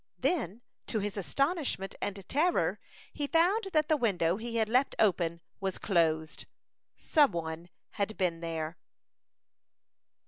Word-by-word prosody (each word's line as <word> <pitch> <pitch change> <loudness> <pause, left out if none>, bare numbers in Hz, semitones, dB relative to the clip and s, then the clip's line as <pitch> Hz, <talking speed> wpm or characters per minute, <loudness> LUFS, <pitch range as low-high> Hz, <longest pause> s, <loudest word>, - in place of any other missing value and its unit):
Then, 240 - -1 0.2
to 225 - -1
his 205 -1 -2
astonishment 275 - -1
and 195 -2 -4
terror, 335 +5 +2 0.3
he 290 -1 -2
found 365 +7 +3
that 310 -1 +3
the 310 - +4
window 190 - +1
he 230 +1 -5
had 220 -1 +2
left 255 +5 +2
open 170 -5 +2 0.2
was 195 -2 -2
closed. 160 -4 0 0.5
Some 295 -4 +3
one 165 +1 -4 0.2
had 210 +1 -2
been 175 -3 0
there. 165 -1 -4
205 Hz, 130 wpm, -31 LUFS, 170-280 Hz, 0.5 s, the